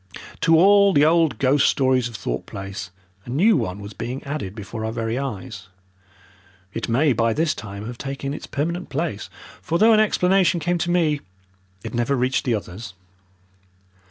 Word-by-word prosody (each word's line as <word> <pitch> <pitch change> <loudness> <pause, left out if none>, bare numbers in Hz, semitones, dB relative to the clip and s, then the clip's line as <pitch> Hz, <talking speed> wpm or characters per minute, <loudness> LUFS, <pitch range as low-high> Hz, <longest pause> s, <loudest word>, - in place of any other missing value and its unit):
To 165 - +4
all 200 +2 +6
the 145 -2 +5
old 165 -1 +3
ghost 140 +1 +3
stories 130 -2 +2
of 115 - -11
Thorpe - - -4
Place 95 -1 -7 0.4
a - - -10
new 185 - +4
one 105 - -2
was 100 +1 -9
being 125 +3 -5
added 140 -9 -5
before 110 +1 -6
our 110 - -2
very 115 0 -2
eyes. 105 -6 -6 1.1
It 115 - -4
may 135 +4 +3
by 115 0 +1
this 155 +3 +1
time 100 -1 -8
have 120 +1 -7
taken 135 0 -4
its - - -7
permanent 170 +5 -3
place, 145 -7 -3 0.3
for 160 - -1
though 220 +4 +6
an 215 - +5
explanation 190 -4 +3
came 175 +2 -1
to 175 - -1
me, 160 -5 +1 0.6
it - - -6
never 120 +3 0
reached 130 +1 0
the 120 -3 +2
others. 100 0 -7
135 Hz, 175 wpm, -22 LUFS, 110-165 Hz, 1.1 s, all